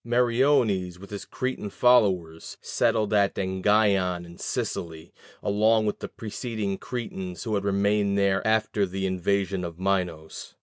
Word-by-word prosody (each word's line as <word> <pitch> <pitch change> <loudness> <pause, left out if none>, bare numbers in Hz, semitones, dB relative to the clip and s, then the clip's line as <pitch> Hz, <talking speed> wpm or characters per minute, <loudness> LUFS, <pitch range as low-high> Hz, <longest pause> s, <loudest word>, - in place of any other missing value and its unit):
Meriones, 120 -6 +2
with 100 +2 -13
his 100 - -6
Cretan 130 -5 -4
followers, 95 -9 +2
settled 105 -1 0
at 100 -1 +3
Engyion 95 -2 +1
in 85 0 -12
Sicily, 80 0 -4 0.3
along 110 +2 +3
with 105 - -2
the - - -5
preceding 110 -3 -4
Cretans 95 -8 -5
who 110 - -3
had 100 -1 0
remained 100 0 +1
there 100 -1 +2
after 110 -2 +1
the 95 +1 -3
invasion 95 +1 0
of 85 -1 -6
Minos. 90 -4 -3
100 Hz, 135 wpm, -26 LUFS, 95-110 Hz, 0.3 s, at